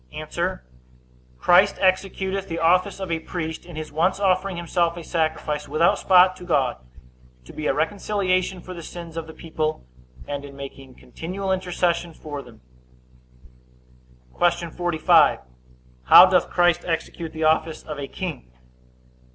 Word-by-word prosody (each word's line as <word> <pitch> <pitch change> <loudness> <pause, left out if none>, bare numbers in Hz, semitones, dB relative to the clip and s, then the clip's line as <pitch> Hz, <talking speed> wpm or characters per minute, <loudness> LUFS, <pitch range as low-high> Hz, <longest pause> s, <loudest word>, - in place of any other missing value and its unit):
A. - - -3 0.8
Christ 180 - +4
executeth 190 0 0
the 165 - -4
office 180 +4 +2
of 190 -3 -5
a 165 - 0
priest, 160 0 -6
in 175 - -10
his 155 0 -6
once 170 +6 +1
offering 190 -1 +1
himself 170 0 0
a 170 - -7
sacrifice 155 -3 -2
without 165 +2 +2
spot 185 0 +5
to - - -11
God, 140 -8 0 0.7
to - - -13
be 155 - -4
a - - +2
reconciliation 185 +1 -1
for 185 - -9
the 170 - -8
sins 170 0 -9
of 165 -1 -5
the 160 - -10
people; 155 - -3 0.4
and 140 -1 -4
in 140 -1 -11
making 135 -1 -10
continual 190 +3 -5
intercession 175 -2 -1
for 145 -2 -7
them. 120 -4 -16 1.8
Q. 170 -1 +1
45. 170 -2 +3 0.7
How 180 - +10
doth 185 -1 +2
Christ 175 -1 +2
execute 165 0 -4
the 160 0 -5
office 160 0 +1
of 150 -2 -7
a 140 - -5
king? 155 - -6
170 Hz, 145 wpm, -23 LUFS, 155-185 Hz, 1.8 s, How